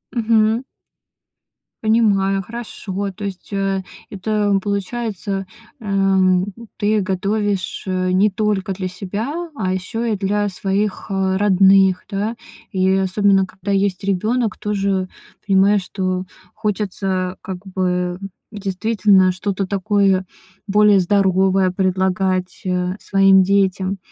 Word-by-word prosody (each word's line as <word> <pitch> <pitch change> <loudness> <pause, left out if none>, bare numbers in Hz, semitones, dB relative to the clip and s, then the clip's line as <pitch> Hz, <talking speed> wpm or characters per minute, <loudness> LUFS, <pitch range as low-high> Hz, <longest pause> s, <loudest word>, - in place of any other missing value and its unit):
Мгм. 225 +1 +2 1.2
Понимаю, 200 -3 +2
хорошо. 200 -3 -5
То 205 - -6
есть, 195 +1 -7
э, 195 -1 -1 0.3
это 205 0 0
получается, 200 -1 -3 0.3
э, 220 - -12
м, 190 -2 +3 0.3
ты 210 0 +1
готовишь, 195 +1 -1
э, 185 -1 -1
не 195 +3 +3
только 200 -2 -1
для 185 0 -4
себя, 225 - -4
а 185 -6 -1
еще 225 +5 -3
и - - +1
для 205 +1 0
своих, 195 +2 -2
э, 190 -1 +1
родных, 195 -1 +4
да. 210 +3 -2 0.4
И 190 -1 +2
особенно, 195 0 +2
когда 190 +2 -6
есть 195 -1 0
ребенок, 215 +3 0
тоже 195 -2 -1 0.4
понимаешь, 195 0 +3
что 185 0 -2 0.3
хочется 195 -3 -2
как 190 -2 -6
бы 180 -1 -1 0.3
действительно 200 -1 +2
что-то 190 +1 -3
такое 195 -1 +1 0.4
более 205 0 +5
здоровое 190 0 +2
предлагать, 185 0 0
э, 180 0 -1
своим 195 -1 +4
детям. 195 0 +1
195 Hz, 110 wpm, -19 LUFS, 185-205 Hz, 1.2 s, более